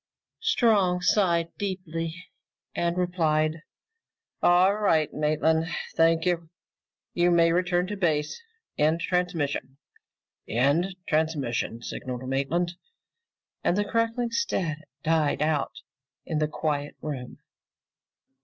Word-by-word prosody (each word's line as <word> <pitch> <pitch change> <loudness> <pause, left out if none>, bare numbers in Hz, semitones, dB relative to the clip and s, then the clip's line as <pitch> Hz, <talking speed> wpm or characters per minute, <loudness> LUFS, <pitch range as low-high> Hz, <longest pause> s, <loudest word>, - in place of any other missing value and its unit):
Strong 220 - +3
sighed 170 -4 +2
deeply 175 -3 -4 0.5
and 170 0 -1
replied, 160 -3 +1 0.8
"All 180 +3 +5
right, 165 -8 +2
Maitland. 155 +2 +1 0.3
Thank 165 0 +3
you. 170 -2 0 0.6
You 175 0 +3
may 170 -1 +4
return 175 0 +1
to 205 +2 -4
base. 160 - 0 0.4
End 155 +3 +3
transmission." 160 -7 -1 0.7
"End 145 - +1
transmission!" 145 -7 -1
signaled 130 0 -5
Maitland, 170 +7 -1 0.9
and 180 - +2
the 205 - +1
crackling 230 +2 0
static 180 - -1 0.2
died 155 -2 +2
out 150 -2 0 0.5
in 155 - -1
the 155 - +2
quiet 145 -2 -2
room. 135 -5 -5
165 Hz, 100 wpm, -26 LUFS, 155-180 Hz, 0.9 s, All